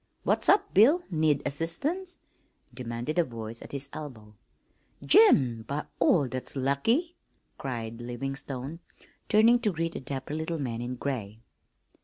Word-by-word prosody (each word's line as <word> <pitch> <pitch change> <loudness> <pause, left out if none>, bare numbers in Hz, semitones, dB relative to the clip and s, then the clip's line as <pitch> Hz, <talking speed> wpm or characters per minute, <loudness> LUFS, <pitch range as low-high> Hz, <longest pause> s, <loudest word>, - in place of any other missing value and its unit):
"What's - - +2
up, 405 - +4
Bill? 285 - +6
Need 155 -3 +2
assistance?" 285 - -2 0.6
demanded 120 +6 -3
a - - +5
voice 115 -4 -7
at - - -10
his 140 0 -4
elbow. 115 -9 -8 0.7
"Jim, 130 - +6
by 145 +2 -3
all 165 -4 +4
that's 130 +2 -5
lucky!" 225 - +1 0.4
cried 115 -3 -5
Livingstone, 135 +4 -5 0.5
turning 225 +3 +6
to 215 -4 +2
greet 165 -1 -2
a - - -3
dapper 135 +1 -5
little 160 +2 -2
man 120 -5 -3
in 125 +1 -4
gray. 115 -5 -4
140 Hz, 135 wpm, -28 LUFS, 125-170 Hz, 0.7 s, Bill